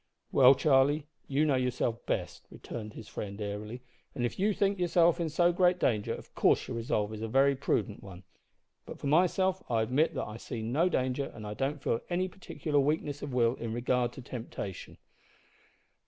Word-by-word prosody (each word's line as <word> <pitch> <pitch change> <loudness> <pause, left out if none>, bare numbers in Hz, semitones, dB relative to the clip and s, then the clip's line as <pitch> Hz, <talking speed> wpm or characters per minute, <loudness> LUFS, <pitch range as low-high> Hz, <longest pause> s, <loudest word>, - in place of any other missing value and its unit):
"Well, 135 0 +7
Charlie, 145 +1 +3 0.2
you 145 +3 +2
know 150 - +2
yourself 125 -2 -1
best," - - -3
returned 110 -2 -8
his 110 - -10
friend 100 0 -6
airily, 105 +4 -5 0.3
"and 120 -3 0
if 120 - -4
you 205 +3 +3
think 200 -1 0
yourself 175 -1 +3
in 165 -2 -1
so 175 +3 +3
great 180 0 +3
danger, 110 -11 0
of - - -7
course - - +2
your - - -4
resolve 110 -2 -1
is 110 - -7
a 115 - -2
very 135 +4 +3
prudent 120 -5 -1
one; 95 -1 -11 0.6
but - - -8
for - - -9
myself, 185 +5 +2
I 115 -2 +2
admit 130 +8 +1
that - - -2
I 105 +1 -7
see 115 -1 -6
no 145 +11 +2
danger, 130 -2 -1
and 110 - -8
I 105 - -4
don't 135 +4 -2
feel 115 - +1
any 185 +1 0
particular 160 -5 -2
weakness 145 0 0
of 145 - -5
will 120 -1 +3
in 115 -1 -4
regard 120 0 0
to 130 - -10
temptation." 115 -6 -7
130 Hz, 190 wpm, -30 LUFS, 115-155 Hz, 0.6 s, Well